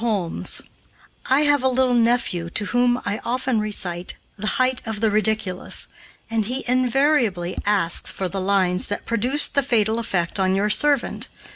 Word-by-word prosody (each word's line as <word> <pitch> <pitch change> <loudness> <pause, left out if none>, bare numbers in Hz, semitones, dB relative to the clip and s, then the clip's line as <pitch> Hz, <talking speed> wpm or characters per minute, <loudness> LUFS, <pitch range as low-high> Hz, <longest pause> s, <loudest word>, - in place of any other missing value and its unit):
HOLMES: 200 -8 0 0.7
"I 265 +3 +4
have 290 -2 +3
a 260 - +2
little 255 0 +2
nephew 230 -8 +1
to 205 - -2
whom 245 +2 +1
I 205 +1 -2
often 255 -1 0
recite 185 -4 -2 0.2
'The 215 +1 -5
Height 255 0 +2
of 220 -1 -3
the 220 -1 +1
Ridiculous,' 215 -3 0 0.4
and 225 -1 -1
he 255 +5 -1
invariably 250 - +1
asks 195 -5 +2
for 190 - -3
the 195 +2 -4
lines 185 -2 +1
that 205 - -4
produced 250 +6 0
the 280 - +3
fatal 225 -4 +1
effect 190 -5 -2
on 190 0 +2
your 205 +2 +1
servant. 285 +2 +2
220 Hz, 160 wpm, -22 LUFS, 195-250 Hz, 0.7 s, I